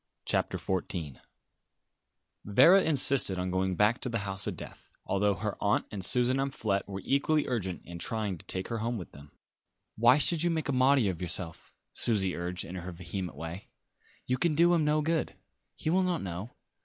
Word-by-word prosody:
CHAPTER - - 0
XIV 85 -6 -3 1.3
Vera 170 - +6
insisted 140 - +3
on 90 0 -2
going 95 0 0
back 105 +5 +2
to 125 - -2
the 115 - -1
house 95 0 +3
of - - -4
death, - - -11 0.2
although 100 +1 +1
her 105 +3 -4
aunt 105 0 +2
and 100 -3 -5
Susan 125 +5 +2
Amphlett 130 -8 -1
were 95 -1 -6
equally 145 +2 +1
urgent 95 -8 -3
in 85 0 -8
trying 105 -3 -3
to - - -15
take 95 0 -4
her 115 -1 -2
home 115 +2 -2
with 90 - -8
them. 70 +1 -14 0.7
"Why 120 +4 +5
should 155 +2 +2
you 175 - +2
make 160 -3 -2
a - - +1
martyr 130 -4 +4
of 85 - -9
yourself?" 90 -1 -4 0.2
Susie 100 -6 0
urged 90 +1 -4
in 85 - -8
her 90 0 -6
vehement 90 0 -6
way. 85 +4 -7 0.6
"You 125 0 -1
can 165 -1 +2
do 170 +3 +5
him 165 -2 +3
no 150 0 +2
good. 160 +1 -1 0.4
He 155 - -2
will 185 +2 +3
not 180 -2 -1
know. 95 +5 -6
105 Hz, 190 wpm, -29 LUFS, 95-140 Hz, 1.3 s, Vera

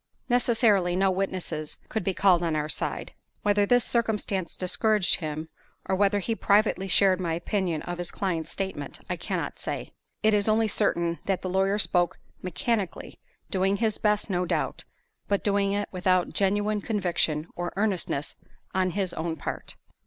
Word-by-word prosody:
Necessarily, 225 -7 +3
no 190 +1 +3
witnesses 185 -5 -3
could 220 - -2
be 190 0 -1
called 185 -3 +4
on 165 -2 0
our 150 0 0
side. - - -2 0.3
Whether 205 0 +3
this 245 +1 +4
circumstance 210 -6 -1
discouraged 205 +2 +2
him, 155 -1 -4 0.4
or 190 - +1
whether 200 +1 +3
he 205 +3 -1
privately 205 -2 +2
shared 190 0 +5
my 165 -2 0
opinion 175 -2 -1
of 175 0 -5
his 175 - -2
client's 165 -5 -2
statement, 190 -1 -4
I - - +1
cannot - - -3
say. - - -5 0.3
It 215 0 +4
is 205 0 +2
only 220 +1 +3
certain 170 -4 0
that 195 -2 -1
the 185 - -2
lawyer 195 +2 +2
spoke 175 -4 +2 0.2
mechanically, 185 +4 -2 0.3
doing 195 0 +2
his 220 0 0
best, 210 -1 +1
no 180 -3 0
doubt, - - -1 0.4
but 200 -1 0
doing 200 -1 +2
it 205 0 -1
without 185 -1 +1
genuine 205 +1 +1
conviction 175 -7 0
or 175 0 -3
earnestness 190 -8 -1 0.4
on 185 -1 +2
his 190 -3 0
own 160 0 -2
part. 150 - -5
190 Hz, 160 wpm, -27 LUFS, 175-205 Hz, 0.4 s, shared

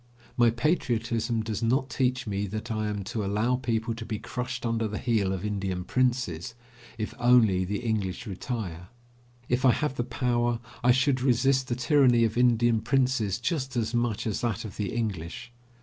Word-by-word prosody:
My 120 -1 +5
patriotism 115 -3 0
does 110 -2 -3
not 130 +4 +1
teach 130 +1 0
me 100 -1 -2
that 110 +4 -5
I 110 -1 -1
am 105 -1 -3
to 105 +3 -3
allow 105 +5 +1
people 115 -2 -1
to 115 0 -7
be 110 -1 -4
crushed 125 +2 -5
under 115 -1 0
the 105 0 -4
heel 110 -6 +1
of 95 +1 -3
Indian 95 -3 -2
princes, 120 -5 -1 0.4
if 110 -1 -4
only 110 -7 +4
the 100 +2 -3
English 110 -4 -2
retire. 95 -4 -5 0.6
If 125 +1 0
I 130 -2 +6
have 150 -3 -2
the 120 - +1
power, 120 -1 0 0.2
I 125 - +4
should 130 +1 +3
resist 130 +1 +2
the 120 - -1
tyranny 125 -2 +4
of 115 -1 +1
Indian 120 -2 +3
princes 125 -6 +1
just 130 -2 -2
as 115 0 -1
much 120 -3 0
as 110 -3 -2
that 115 -2 -2
of 100 - -8
the 105 -2 -2
English. 110 0 -4
115 Hz, 180 wpm, -27 LUFS, 105-125 Hz, 0.6 s, I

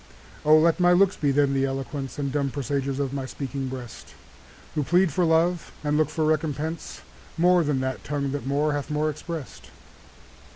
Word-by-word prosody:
O! 155 +1 +7
let 165 +3 +3
my 175 0 +5
looks 195 +2 +4
be 145 - 0
then 140 0 +3
the 135 0 +2
eloquence 135 0 -4
And 140 -2 -2
dumb 140 -1 0
presagers 140 0 -2
of 140 -1 -2
my 135 -2 -3
speaking 135 0 -4
breast, 125 -3 -8 0.6
Who 150 - 0
plead 175 +2 +3
for 180 - +2
love, 165 +1 +2
and 150 0 0
look 155 -1 +2
for 155 0 -1
recompense, 155 +1 -2 0.4
More 175 +1 +4
than 145 -3 0
that 130 0 -3
tongue 140 -2 -2
that 140 -1 -4
more 145 +2 +1
hath 145 0 -3
more 150 +1 0
express'd. 155 -1 -7
O! - - -18
145 Hz, 190 wpm, -25 LUFS, 135-160 Hz, 0.6 s, O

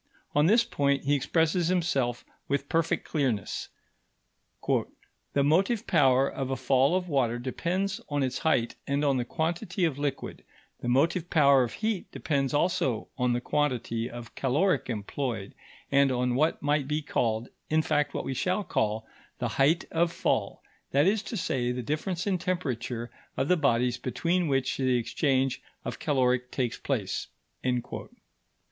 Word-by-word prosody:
On 150 +2 +4
this 230 +5 +5
point 140 - 0
he 145 - +2
expresses 165 +4 +2
himself 140 -9 0 0.2
with 140 0 -1
perfect 165 0 0
clearness: 130 - -1 1.0
"The 140 - -2
motive 195 +10 +2
power 135 -6 +4
of 135 -1 -4
a 135 - 0
fall 130 +4 +3
of 185 -1 -1
water 130 -7 +1
depends 180 +10 -2
on 145 -1 0
its 130 -1 -1
height 120 -7 +1
and 140 +1 +1
on 140 -2 +3
the 120 - -1
quantity 170 - -1
of 145 -4 -1
liquid; 145 -2 -3 0.4
the - - -5
motive 160 +7 +2
power 140 -4 +5
of 120 - -1
heat 215 -4 -2
depends 140 -3 -1
also 145 -7 0
on 125 -1 +2
the 120 - -1
quantity 125 -5 -1
of 120 -1 -9
caloric 145 +8 +1
employed, 115 -1 -3 0.4
and 140 -1 +4
on 125 0 +1
what 155 +5 +1
might 145 -1 +1
be 150 +1 -1
called 115 -4 -1 0.2
in 155 0 +3
fact, 150 -1 0
what - - -2
we 135 - -2
shall 185 +9 0
call 110 - -1 0.3
the - - -2
height 150 +5 +2
of 170 +1 +2
fall, - - -1 0.3
that 140 +2 +3
is 200 +2 +3
to 225 - -5
say, 125 -8 0
the 125 0 -3
difference 160 +7 -2
in 190 -3 +1
temperature 125 -10 -3 0.3
of 135 - +1
the 180 - +6
bodies 125 -5 +1
between 170 +8 0
which 135 -2 0
the 130 -2 +2
exchange 130 +2 0 0.2
of - - -4
caloric 125 -3 +1
takes 125 -3 -2
place." - - -2
140 Hz, 155 wpm, -28 LUFS, 125-165 Hz, 1.0 s, the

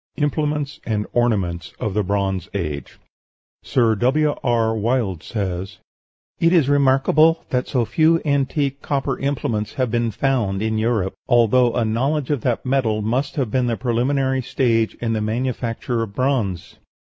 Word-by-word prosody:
IMPLEMENTS 150 -1 -1
AND 105 -2 -1
ORNAMENTS 100 -9 0
OF 105 - -2
THE 105 - +1
BRONZE 95 -2 -1
AGE 75 -7 -4 0.6
Sir 115 -3 +2
W. 145 +7 +2
R. 115 -2 +1
Wilde 110 -6 0
says, 95 -3 -4 0.6
"It 165 - +3
is 165 -7 +4
remarkable 145 +3 +3
that 125 0 0
so 125 -3 0
few 160 +8 +3
antique 140 -1 0
copper 140 -2 -2
implements 125 -6 -2
have 130 -4 0
been 120 -1 +1
found 110 -5 0
(in 110 0 0
Europe), 110 -4 0
although 120 0 +4
a 120 - +1
knowledge 135 +6 0
of 145 -5 0
that 120 +1 -1
metal 120 -5 +1
must 125 +6 -1
have 130 -7 -1
been 125 0 +1
the 115 -1 -1
preliminary 130 +2 0
stage 115 -3 0
in 115 -1 -2
the 110 - -1
manufacture 115 +1 -2
of 105 -3 -5
bronze." 125 -10 -1
120 Hz, 150 wpm, -21 LUFS, 110-135 Hz, 0.6 s, is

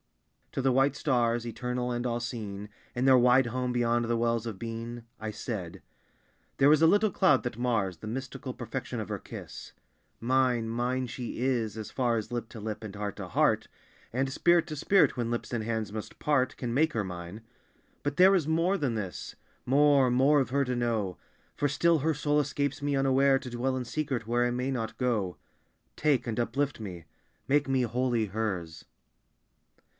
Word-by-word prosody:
To - - -1
the 135 - +3
white 135 +2 +3
stars, 120 -4 +1
Eternal 125 +1 -3
and 120 0 -2
all 120 -1 0
seeing, 105 -4 -5 0.3
In 125 +2 0
their 130 -1 +7
wide 125 +1 +5
home 125 +1 -2
beyond 120 -1 +1
the 115 0 0
wells 115 0 0
of 105 -5 -6
being, 115 +1 -6
I 110 - -5
said 105 -6 -5 0.8
"There 140 +2 +6
is 155 - +3
a 165 - +7
little 205 +4 +4
cloud 135 -8 +3
that 120 -3 -4
mars 115 -8 0
The 110 - -9
mystical 130 +3 -5
perfection - - -5
of - - -5
her - - -3
kiss. - - -9 0.5
Mine, 125 -1 +2
mine, 125 +3 -1
She 120 0 -6
is, 120 -4 0
As 110 -2 -6
far 120 -3 +1
as 110 +2 -5
lip 120 -2 -3
to 115 - -9
lip, 110 +1 -5
and 105 -3 -7
heart 100 -1 -4
to - - -6
heart; - - +2 0.4
And 135 +3 0
spirit 170 +5 +3
to 155 - -5
spirit 195 +7 +3
when 120 -2 -2
lips 120 +1 -3
and 115 -2 -1
hands 110 -2 -2
must 110 -1 -7
part, 140 -4 +1
Can 120 -2 -3
make 155 +4 +2
her 110 - 0
mine. 90 +3 -7 0.6
But 145 0 -2
there 190 +2 +7
is 165 -6 +1
more 165 +5 +2
than 135 -8 -1
this, 100 -5 -5 0.3
More, 140 0 +5
more 135 +4 +4
of 130 - -2
Her 140 +2 +1
to 125 0 -1
know. 115 -6 -1 0.4
For 145 - 0
still 165 +3 +3
her 155 +2 +1
soul 150 +1 +1
escapes 145 -1 -1
me 145 0 0
unaware, 135 0 +3
To 125 -2 -8
dwell 130 +2 -1
in 125 - -3
secret 135 -3 -2
where 120 +1 +2
I 120 - +1
may 125 +2 -1
not 115 -4 -3
go. 110 -8 -1 0.6
Take, 145 -6 +1
and 115 - -2
uplift 135 +4 -1
me. 90 -6 -7 0.4
Make 145 0 +2
me 130 -1 +2
wholly 120 -1 0
Hers." 95 -6 -3
125 Hz, 190 wpm, -29 LUFS, 115-135 Hz, 0.8 s, their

